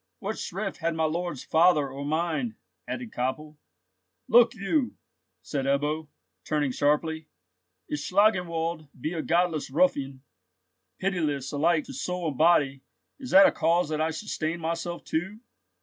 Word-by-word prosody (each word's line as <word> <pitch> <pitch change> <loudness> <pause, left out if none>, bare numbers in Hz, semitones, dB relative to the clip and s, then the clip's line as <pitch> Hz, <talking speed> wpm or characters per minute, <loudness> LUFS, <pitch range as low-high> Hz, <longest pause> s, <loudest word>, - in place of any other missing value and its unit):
"What 210 +3 -4
shrift 195 +2 -4
had 165 -1 -1
my 160 - 0
lord's 170 -2 -2
father, 160 -3 +4
or 135 +2 -6
mine?" 170 - -1 0.3
added 245 -3 -5
Koppel. 150 +4 -3 0.7
"Look 235 +1 +6
you!" 245 +7 0 0.5
said 140 -3 -3
Ebbo, 150 +3 0 0.4
turning 150 -3 0
sharply. 150 +3 0 0.6
"If 150 - -3
Schlangenwald 170 -3 +1
be 155 +7 -3
a 165 - -2
godless 170 -2 +1
ruffian, 140 - +1 0.7
pitiless 155 -8 -1
alike 155 +2 +2
to - - -10
soul 175 +5 -2
and 140 - -7
body, 145 -5 +4 0.4
is 260 -2 -7
that 195 +1 +8
a - - +5
cause 165 0 +1
that 155 0 -1
I 160 - +1
should 185 +7 -6
stain 160 +2 -2
myself 170 +1 -3
too?" 190 +7 -3
160 Hz, 145 wpm, -27 LUFS, 150-180 Hz, 0.7 s, that